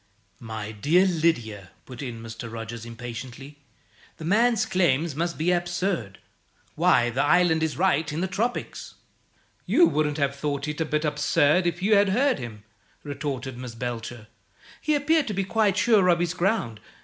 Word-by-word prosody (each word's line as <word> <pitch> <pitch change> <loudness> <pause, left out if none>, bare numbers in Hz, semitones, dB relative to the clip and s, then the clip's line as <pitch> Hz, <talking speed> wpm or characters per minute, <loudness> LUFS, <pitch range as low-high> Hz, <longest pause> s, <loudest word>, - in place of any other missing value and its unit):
"My 110 -2 -6
dear 155 - +3
Lydia," 120 - 0 0.2
put 125 -2 -9
in 120 -4 -6
Mr. 115 0 -8
Rogers, 115 0 -7
impatiently, 120 +4 -8 0.6
"the 160 - -8
man's 225 +5 +3
claim 170 -5 +2
must 170 +2 -2
be 165 +3 +1
absurd. 175 - -1 0.6
Why, 120 0 +3
the 130 +4 0
island 160 +1 +3
is 160 -1 -1
right 160 -4 +1
in 150 - -3
the 185 - 0
tropics!" 220 +6 -3 0.7
"You 345 - +5
wouldn't 150 - 0
have 140 -2 0
thought 140 0 -3
it 150 +1 -4
a - - +1
bit 150 0 -1
absurd 150 +3 +2
if 175 +1 -3
you 210 +2 +4
had 200 0 +4
heard 260 - +2
him," 110 -4 -8 0.4
retorted 135 -3 -5
Miss 125 -2 -7
Belcher. 120 -1 -5 0.6
"He 305 -1 +1
appeared 300 +1 +2
to 210 - -3
be 195 - 0
quite 205 0 +1
sure 215 -6 +4
of 175 -1 +4
his 175 0 -1
ground. 180 - -1
150 Hz, 165 wpm, -25 LUFS, 120-180 Hz, 0.7 s, You